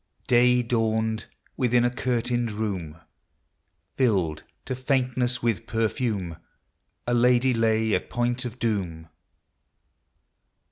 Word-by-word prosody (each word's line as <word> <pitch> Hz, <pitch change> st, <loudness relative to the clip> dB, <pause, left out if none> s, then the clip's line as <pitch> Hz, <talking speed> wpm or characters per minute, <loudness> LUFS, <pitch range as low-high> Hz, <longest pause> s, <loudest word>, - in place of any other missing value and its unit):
Day 125 Hz, 0 st, +4 dB
dawned; 110 Hz, -2 st, 0 dB
— -, -, -37 dB
within 120 Hz, -1 st, +3 dB
a 120 Hz, -, +2 dB
curtained 120 Hz, -1 st, 0 dB
room, 95 Hz, -8 st, -4 dB, 1.0 s
Filled 95 Hz, -, +1 dB, 0.2 s
to 130 Hz, -, -3 dB
faintness 125 Hz, -1 st, 0 dB
with 115 Hz, -6 st, 0 dB
perfume, 110 Hz, -6 st, -1 dB, 0.7 s
A 120 Hz, -, 0 dB
lady 125 Hz, +1 st, +4 dB
lay 110 Hz, -1 st, +2 dB
at -, -, -1 dB
point 120 Hz, +1 st, 0 dB
of 120 Hz, -1 st, -6 dB
doom. 90 Hz, -9 st, -2 dB
120 Hz, 105 wpm, -25 LUFS, 110-125 Hz, 1.0 s, Day